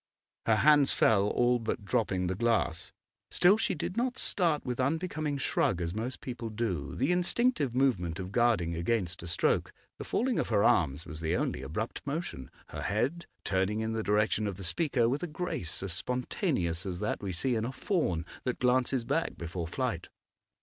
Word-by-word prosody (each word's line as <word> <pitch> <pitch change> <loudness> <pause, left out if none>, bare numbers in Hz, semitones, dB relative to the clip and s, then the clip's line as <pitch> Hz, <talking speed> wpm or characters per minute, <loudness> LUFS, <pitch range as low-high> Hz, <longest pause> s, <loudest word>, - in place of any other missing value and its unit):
Her 115 - +5
hands 145 +3 +5
fell, 100 -2 +4
all 120 +2 +2
but 110 -2 -3
dropping 95 -3 0
the 90 - 0
glass; 95 -5 0 0.4
still, 180 +3 +5
she 220 -4 0
did 175 +4 -4
not 245 +1 0
start 170 -6 +1
with 125 0 -3
unbecoming 155 +1 -1
shrug 95 -8 +1
as 85 0 -2
most 115 +5 -4
people 120 -3 -5
do, 105 -9 -3
the 135 +6 +1
instinctive 180 - +1
movement 95 -11 +1
of 95 0 -5
guarding 110 -8 +2
against 90 0 -1
a 85 - -7
stroke; 85 - +1 0.3
the - - -4
falling 250 0 0
of - - -1
her 105 -3 +3
arms 75 0 +2
was 80 -2 -8
the 80 +1 0
only 65 - -1
abrupt 80 - -4
motion, 140 - -4 0.2
her - - -6
head 135 +12 -1 0.2
turning 95 +3 0
in 110 0 -1
the 110 - -1
direction 105 0 +1
of 100 -3 -4
the 95 - -7
speaker 120 - +1
with 135 +5 0
a 175 - -2
grace 95 - -3
as 95 -3 -3
spontaneous 120 - -1
as 95 -3 -4
that 105 - -2
we 100 -2 -3
see 125 +9 -1
in 110 -2 0
a 120 - -2
fawn 120 - -1 0.2
that 125 - -1
glances 125 0 +2
back - - -1
before 85 0 -4
flight. - - -3
115 Hz, 185 wpm, -30 LUFS, 90-135 Hz, 0.4 s, Her